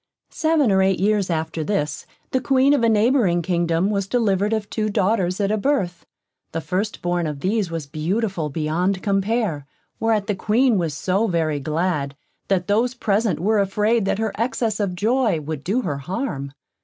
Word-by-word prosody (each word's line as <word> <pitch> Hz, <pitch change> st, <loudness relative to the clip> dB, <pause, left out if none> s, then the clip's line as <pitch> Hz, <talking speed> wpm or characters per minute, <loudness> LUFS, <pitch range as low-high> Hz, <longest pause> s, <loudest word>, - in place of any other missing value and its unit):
Seven 315 Hz, -7 st, +2 dB
or 190 Hz, 0 st, +4 dB
eight 190 Hz, 0 st, +2 dB
years 205 Hz, 0 st, +1 dB
after 160 Hz, -1 st, -2 dB
this, 155 Hz, -5 st, -2 dB, 0.2 s
the 260 Hz, -, +1 dB
Queen 270 Hz, +1 st, +3 dB
of 285 Hz, -, +2 dB
a 230 Hz, -, +3 dB
neighbouring 215 Hz, -5 st, +3 dB
kingdom 170 Hz, +2 st, +1 dB
was 200 Hz, -2 st, -1 dB
delivered 205 Hz, -3 st, +1 dB
of 220 Hz, -2 st, -1 dB
two 215 Hz, 0 st, -2 dB
daughters 190 Hz, -2 st, +1 dB
at 200 Hz, 0 st, +1 dB
a 215 Hz, -, +1 dB
birth. 195 Hz, -9 st, -1 dB, 0.5 s
The 165 Hz, -, -2 dB
first 185 Hz, +7 st, -3 dB
born 175 Hz, -1 st, 0 dB
of 145 Hz, -2 st, -5 dB
these 200 Hz, -1 st, 0 dB
was 165 Hz, -3 st, -4 dB
beautiful 170 Hz, +3 st, -2 dB
beyond 165 Hz, +6 st, -1 dB
compare, 195 Hz, -, 0 dB, 0.3 s
whereat 220 Hz, -2 st, +1 dB
the 210 Hz, -, 0 dB
Queen 220 Hz, +3 st, +2 dB
was 160 Hz, -4 st, -2 dB
so 195 Hz, +7 st, 0 dB
very 160 Hz, -5 st, 0 dB
glad, 150 Hz, -1 st, -1 dB, 0.3 s
that 185 Hz, -2 st, +1 dB
those 230 Hz, +6 st, +1 dB
present 210 Hz, -, 0 dB
were 210 Hz, +5 st, +2 dB
afraid 210 Hz, +2 st, +1 dB
that 195 Hz, -, 0 dB
her 220 Hz, -1 st, -1 dB
excess 230 Hz, -3 st, -1 dB
of 195 Hz, -4 st, -1 dB
joy 220 Hz, -2 st, +1 dB
would 150 Hz, -1 st, -5 dB
do 215 Hz, +8 st, 0 dB
her 145 Hz, -7 st, -2 dB
harm. 145 Hz, -, -4 dB
195 Hz, 180 wpm, -22 LUFS, 170-220 Hz, 0.5 s, or